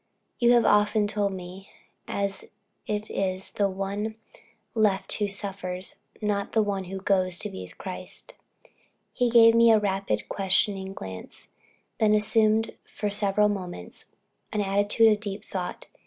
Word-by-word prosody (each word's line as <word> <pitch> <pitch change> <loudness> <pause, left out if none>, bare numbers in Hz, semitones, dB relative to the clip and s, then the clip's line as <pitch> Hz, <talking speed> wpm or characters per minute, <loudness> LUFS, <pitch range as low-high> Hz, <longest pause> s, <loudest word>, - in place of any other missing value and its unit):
You 240 0 +5
have 240 -1 +4
often 210 +1 +4
told 205 -1 0
me 185 +1 -9 0.4
it 200 -1 -3 0.4
is 195 -3 -2
the 200 -1 +1
one 200 +3 -3 0.6
left 210 -4 +1
alone - - -6
who 205 -1 0
suffers, 190 -2 -4 0.2
not 205 -2 -1
the 220 - +4
one 200 -2 -2
who 190 +1 -6
goes 185 -2 +2
to 210 +2 -2
be 190 - -7
with - - -11
Christ." - - -7 0.8
He 245 -2 +1
gave 230 -1 +7
me 230 0 +6
a 220 - +6
rapid, 195 - -1
questioning 195 0 0
glance, 95 - -8 0.5
then 215 -1 +4
assumed 215 +1 +2
for 210 -1 -4
several 205 0 +2
moments 180 - -5 0.4
an 210 -1 0
attitude 205 +3 +4
of 210 - -3
deep 205 -1 -5
thought. 180 -2 -5
200 Hz, 145 wpm, -26 LUFS, 190-215 Hz, 0.8 s, gave